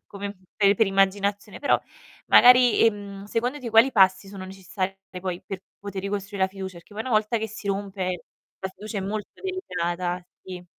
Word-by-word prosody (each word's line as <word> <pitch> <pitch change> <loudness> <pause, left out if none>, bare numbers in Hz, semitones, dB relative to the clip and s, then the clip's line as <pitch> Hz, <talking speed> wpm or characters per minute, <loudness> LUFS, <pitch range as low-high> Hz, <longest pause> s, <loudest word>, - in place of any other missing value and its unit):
come 200 0 -6 0.2
pe 200 -1 +5
per 225 - +3
immaginazione, 200 +1 +1
però 285 - +3 0.5
magari, 250 -1 +7
ehm, 200 -2 -1
secondo 240 +6 -1
te 235 -2 -5
quali 230 +4 +6
passi 190 -1 +4
sono 195 -2 -8
necessari 190 0 -4 0.3
poi 180 -1 -3
per 190 -1 -6 0.2
poter 200 -1 -6
ricostruì 200 0 -4
la 190 - +4
fiducia? 190 -1 -7
Perché 170 - -18
poi 220 - -3
una 260 - -5
volta 215 +2 +2
che 220 0 -3
si 210 -1 -7
rompe 195 -2 -2 0.4
la 190 - -3
fiducia 210 +2 -6
è - - -2
molto 210 +2 -3
delicata, 180 - -2 0.2
sì. 180 -1 -8
200 Hz, 180 wpm, -25 LUFS, 190-215 Hz, 0.5 s, magari